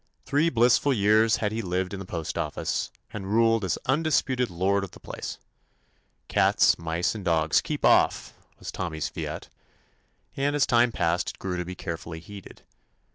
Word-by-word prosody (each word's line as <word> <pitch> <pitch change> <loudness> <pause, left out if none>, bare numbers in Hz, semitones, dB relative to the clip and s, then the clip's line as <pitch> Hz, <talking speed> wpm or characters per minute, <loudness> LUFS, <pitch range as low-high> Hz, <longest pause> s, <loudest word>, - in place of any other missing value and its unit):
Three 150 +4 +2
blissful 125 +2 +3
years 110 0 +4
had 105 -1 -1
he 110 +1 -2
lived 90 0 -2
in 100 - -5
the 95 - -8
postoffice* 80 -4 -3 0.2
and 100 -3 -5
ruled 115 0 +3
as 90 -4 0
undisputed 135 -4 +1
lord 95 +3 +1
of 95 - -8
the - - -13
place. - - -7 0.9
"Cats, - - +3
mice, 85 +1 -1
and 105 -3 -7
dogs, 80 -3 +2
keep - - -3
off - - +3
I" - - -31
was - - -7
Tommy's 80 -5 -3
fiat, - - -6 0.9
and 140 +1 0
as 145 - +3
time 120 0 +3
passed 85 -3 0
it - - -9
grew 95 -1 -4
to 90 0 -3
be 90 +1 -6
carefully 85 -1 -6
heeded. 100 +4 -12
100 Hz, 170 wpm, -26 LUFS, 85-115 Hz, 0.9 s, years